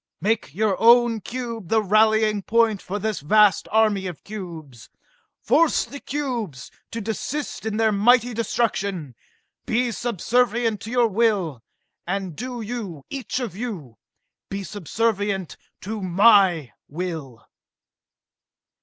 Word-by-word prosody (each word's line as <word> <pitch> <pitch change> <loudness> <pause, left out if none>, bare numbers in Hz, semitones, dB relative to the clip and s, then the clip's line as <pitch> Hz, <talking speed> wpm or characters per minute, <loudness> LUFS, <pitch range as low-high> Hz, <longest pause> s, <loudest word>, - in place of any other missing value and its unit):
Make 205 -6 -1
your 210 -1 +1
own 235 0 +5
cube 230 -5 -6
the 220 -1 +3
rallying 215 +1 +3
point 225 -1 +2
for 200 - -4
this 215 0 -2
vast 205 +5 +4
army 210 -3 +2
of 175 -4 -8
cubes, 165 - -9 0.5
force 330 -1 +3
the 285 - -9
cubes 245 - -4 0.2
to 230 - -5
desist 225 +4 -4
in 215 -1 -2
their 220 -1 +3
mighty 240 +4 +4
destruction, 200 - -1 0.5
be 240 +1 +1
subservient 235 0 0
to 220 - -7
your 245 -1 +3
will 195 - 0 0.5
and 190 -3 -3
do 245 - -5
you, 205 - -6
each 265 -2 -3
of 235 -8 -5
you, 185 - -6 0.5
be 195 0 -4
subservient 205 -1 -2 0.3
to 210 +2 -5
my 185 - +4 0.2
will!" 155 -7 -6
215 Hz, 120 wpm, -23 LUFS, 185-230 Hz, 0.5 s, own